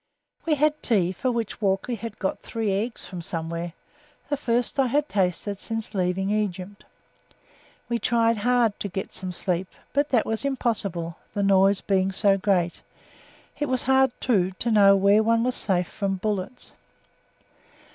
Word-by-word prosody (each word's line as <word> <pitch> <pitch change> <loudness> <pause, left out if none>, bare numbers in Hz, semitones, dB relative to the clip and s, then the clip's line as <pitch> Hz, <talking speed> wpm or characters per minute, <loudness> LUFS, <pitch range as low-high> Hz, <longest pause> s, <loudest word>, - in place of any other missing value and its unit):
We 310 - +3
had 300 +1 +1
tea 185 -6 +2
for 250 +7 -2
which 230 -2 -3
Walkley 195 +4 0
had 225 -1 -6
got 190 - -2
three 225 -3 -2
eggs 220 +5 -2
from 180 -2 -7
somewhere, 165 0 -4 0.6
the 290 - +1
first 245 -1 -1
I 265 - +4
had 290 +4 +1
tasted 195 +1 -1
since 225 -1 -4
leaving 190 +1 0
Egypt. 200 -1 -3 1.0
We 235 -1 -1
tried 230 -1 +2
to 235 -3 +1
get 190 0 -5
some 185 -1 -4
sleep, 180 0 -1 0.3
but 285 +1 +1
that 240 -4 +2
was 225 +2 -2
impossible, 200 -11 -2 0.2
the 200 - 0
noise 195 0 +4
being 190 -1 +1
so 195 +1 +3
great; 185 -3 0 0.8
it 295 - 0
was 255 -1 0
hard, 265 0 +4
too, 190 -7 +1
to 235 - -1
know 200 -2 +6
where 200 +2 +4
one 230 +1 +2
was 250 +1 0
safe 180 -6 0
from 195 -1 -2
bullets. 205 +4 -4
205 Hz, 155 wpm, -25 LUFS, 190-235 Hz, 1.0 s, know